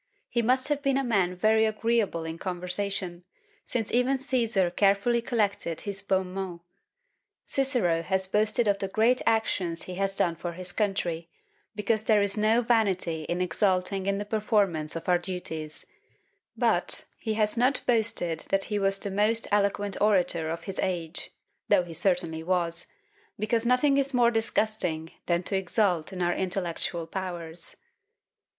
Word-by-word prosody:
He 235 - +1
must 255 +4 +2
have 290 -1 0
been 275 -1 +1
a 275 - +1
man 195 -7 +1
very 220 +4 +3
agreeable 215 -5 0
in 160 +1 -6
conversation, 180 0 -3 0.4
since 225 -4 -2
even 250 +3 +3
Cæsar 230 -9 0
carefully 200 +4 +3
collected 205 -8 -1
his 200 -2 -5
bons 190 -1 +1
mots. 185 -3 -5 0.8
Cicero 245 -12 +2
has 190 +3 -1
boasted 215 +4 +1
of 200 -1 +2
the 195 - -2
great 225 +6 +2
actions 190 -7 0
he 185 - -7
has 195 0 0
done 170 -3 +1
for 170 +1 -5
his 180 +1 -6
country, 175 -6 -1 0.5
because 215 +1 0
there 210 -2 +4
is 200 -1 +1
no 220 +3 +3
vanity 190 -9 +1
in 175 +3 -2
exulting 190 0 0
in 200 0 +1
the 205 - -4
performance 205 -8 0
of 165 - -6
our 180 -1 +4
duties; 160 -4 -5 0.7
but - - +2
he 220 -2 -2
has 215 0 +1
not 250 +4 +2
boasted 220 -8 +2
that 195 0 +2
he 205 - +1
was 195 0 +2
the 195 0 -4
most 215 +3 +2
eloquent 205 -1 0
orator 180 -6 +2
of 165 +1 -4
his 195 -1 -6
age, 175 -3 -2 0.4
though 200 -3 +5
he 170 -1 -9
certainly 170 -2 0
was; 170 0 0 0.5
because 225 +3 +1
nothing 275 +3 +4
is 275 -1 -1
more 240 -1 +4
disgusting 215 -8 -1 0.2
than 175 0 +1
to 195 - -1
exult 190 -3 +1
in 180 -2 -3
our 175 0 +2
intellectual 175 -2 -2
powers." 170 -2 -5
195 Hz, 155 wpm, -27 LUFS, 175-220 Hz, 0.8 s, though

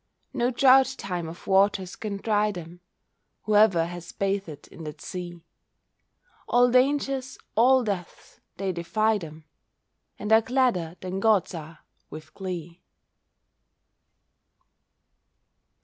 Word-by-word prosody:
No 240 - +1
drouth 265 +1 +4
time 175 -4 -4
of 170 - -11
waters 195 -1 +2
can 205 -2 -5
dry 210 0 +1
them. 175 -2 -9 0.6
Whoever 210 -5 +4
has 175 0 -8
bathed 195 -7 -3
in 165 - -11
that 150 - -8
sea, 175 -2 -7 1.0
All 245 0 +4
dangers, 265 0 +1 0.2
all 255 +3 +4
deaths, 195 -6 -6 0.2
they 195 0 -1
defy 215 +5 0
them, 155 -2 -10 0.7
And 210 +1 0
are 220 - +7
gladder 225 -10 0
than 185 +1 -4
gods 210 -4 +2
are, 160 -1 -9 0.3
with 155 0 -11
glee. 175 -3 -7
195 Hz, 110 wpm, -26 LUFS, 170-225 Hz, 1.0 s, are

